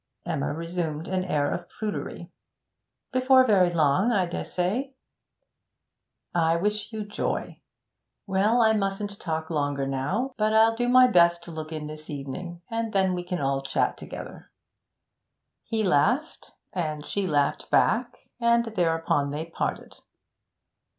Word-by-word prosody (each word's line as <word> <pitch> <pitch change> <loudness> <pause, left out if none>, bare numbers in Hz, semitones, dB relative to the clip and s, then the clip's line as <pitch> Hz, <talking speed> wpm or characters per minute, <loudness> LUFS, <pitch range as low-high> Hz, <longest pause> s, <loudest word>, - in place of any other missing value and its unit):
Emma 160 -5 -1
resumed 165 0 -3
an 185 -1 -1
air 150 -5 0
of 175 0 -6
prudery, 205 -4 -5 0.8
'Before 260 0 +5
very 195 -6 +4
long, 170 - +2
I 195 -5 +2
dessay.' 195 +10 -2 1.4
'I 165 -1 +3
wish 210 +5 -1
you 215 -2 -4
joy. 205 - -3 0.6
Well, 205 +5 +2
I 220 0 +5
mustn't 200 0 -2
talk 160 -1 -3
longer 145 -3 0
now, 165 - -1
but 215 0 +1
I'll 225 +1 +5
do 245 +1 0
my 255 0 +8
best 170 -7 +4
to 170 - -9
look 155 -1 -6
in 155 -1 -4
this 155 0 -8
evening, 170 +5 -6
and 225 -1 -2
then 190 -2 +2
we 180 -1 -3
can 175 0 -3
all 135 -1 0
chat 135 - 0
together.' - - -9 1.2
He 225 -1 -1
laughed 210 - +1 0.2
and 155 -5 -3
she 200 -2 -2
laughed 145 -3 0
back; 240 +2 +2 0.2
and 235 0 +3
thereupon 165 -5 +1
they 150 +3 -4
parted. 165 - -4
180 Hz, 135 wpm, -26 LUFS, 155-215 Hz, 1.4 s, my